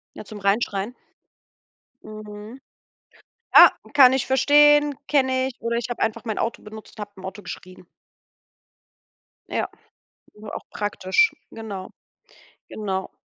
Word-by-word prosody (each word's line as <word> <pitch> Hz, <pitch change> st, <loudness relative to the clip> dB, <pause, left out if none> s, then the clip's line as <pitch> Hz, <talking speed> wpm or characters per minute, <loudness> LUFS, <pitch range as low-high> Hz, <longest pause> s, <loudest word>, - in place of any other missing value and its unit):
Ja, -, -, -8 dB
zum 210 Hz, 0 st, -10 dB
Reinschreien. 200 Hz, +2 st, -1 dB, 1.1 s
Mhm. 215 Hz, +3 st, -10 dB, 0.9 s
Ah, -, -, +10 dB, 0.2 s
kann 260 Hz, -3 st, +7 dB
ich 265 Hz, -, 0 dB
verstehen, 295 Hz, +2 st, +5 dB
kenne 260 Hz, -2 st, +1 dB
ich 265 Hz, -, -8 dB
oder 235 Hz, 0 st, -1 dB
ich 240 Hz, +1 st, -4 dB
habe 240 Hz, -, -5 dB
einfach 225 Hz, +1 st, -1 dB
mein 220 Hz, -, -3 dB
Auto 230 Hz, -, -2 dB
benutzt 215 Hz, +1 st, -12 dB
und -, -, -7 dB
habe 205 Hz, 0 st, -7 dB
im 190 Hz, 0 st, -11 dB
Auto 195 Hz, +2 st, -8 dB
geschrien. 185 Hz, -1 st, -10 dB, 1.6 s
Ja, -, -, -2 dB, 0.8 s
auch -, -, -8 dB
praktisch, 205 Hz, -, +1 dB, 0.2 s
genau. 205 Hz, -4 st, -7 dB, 0.8 s
Genau. 190 Hz, -3 st, -4 dB
220 Hz, 120 wpm, -23 LUFS, 205-260 Hz, 1.6 s, Ah